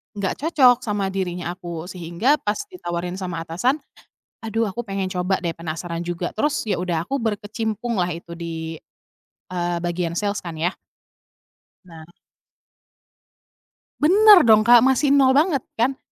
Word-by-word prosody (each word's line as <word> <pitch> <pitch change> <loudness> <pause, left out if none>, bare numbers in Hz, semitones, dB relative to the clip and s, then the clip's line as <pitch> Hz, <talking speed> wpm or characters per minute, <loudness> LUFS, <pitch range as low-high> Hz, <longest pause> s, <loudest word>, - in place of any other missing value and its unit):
Nggak 200 -2 -3
cocok 270 -6 +4
sama 200 -2 -1
dirinya 180 -2 -3
aku, 170 -2 -7
sehingga 180 - 0
pas 210 0 -1 0.2
ditawarin 175 - -5
sama 170 -3 -4
atasan, 185 - 0 0.7
aduh, 225 0 -1
aku 240 +3 -6
pengen 195 -1 -3
coba 180 0 -1
deh, 170 - -1
penasaran 170 +1 -5
juga, 175 0 -3
terus 295 +6 -1
ya 190 - 0
udah, 175 -2 -1
aku 275 +6 -2
berkecimpunglah 220 -2 -2
itu 170 0 -10
di, 160 -1 -5 0.7
eee, 175 -1 -2
bagian 175 -1 -2
sales 205 -1 -2
kan, 165 -2 -7
ya. 175 +3 0 1.1
Nah. 165 -2 -12 2.0
Benar 390 - +7
dong, 215 -1 +6
Kak, 240 +2 +6
masih 265 +2 +3
nol 270 -2 +5
banget 290 -2 +3
kan, 260 +4 0
190 Hz, 140 wpm, -22 LUFS, 175-240 Hz, 2.0 s, Benar